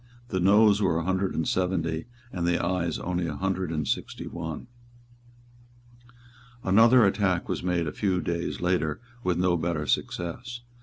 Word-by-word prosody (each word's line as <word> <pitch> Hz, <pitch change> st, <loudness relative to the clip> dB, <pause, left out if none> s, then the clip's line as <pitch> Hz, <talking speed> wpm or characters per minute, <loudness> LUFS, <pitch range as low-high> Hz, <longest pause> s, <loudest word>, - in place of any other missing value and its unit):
The 95 Hz, -, -1 dB
Noes 105 Hz, +2 st, +5 dB
were 90 Hz, -5 st, +2 dB
a 85 Hz, -, -1 dB
hundred 95 Hz, +2 st, 0 dB
and 80 Hz, -, -1 dB
seventy, 85 Hz, -3 st, -1 dB, 0.3 s
and 85 Hz, -2 st, -1 dB
the 85 Hz, 0 st, +2 dB
Ayes 85 Hz, -2 st, -1 dB
only 90 Hz, -1 st, -2 dB
a 75 Hz, -, -4 dB
hundred 95 Hz, +1 st, -2 dB
and 75 Hz, -3 st, -2 dB
sixty -, -, -3 dB
one. 80 Hz, +4 st, -6 dB, 2.0 s
Another 115 Hz, +5 st, +6 dB
attack 95 Hz, -3 st, +1 dB
was -, -, -2 dB
made 90 Hz, -2 st, 0 dB
a 75 Hz, -, -3 dB
few 95 Hz, -3 st, 0 dB
days 85 Hz, -2 st, -3 dB
later 85 Hz, -4 st, 0 dB, 0.2 s
with 90 Hz, -2 st, +1 dB
no 90 Hz, -1 st, +2 dB
better 80 Hz, -2 st, -2 dB
success. 120 Hz, +12 st, -2 dB
90 Hz, 155 wpm, -27 LUFS, 85-95 Hz, 2.0 s, Another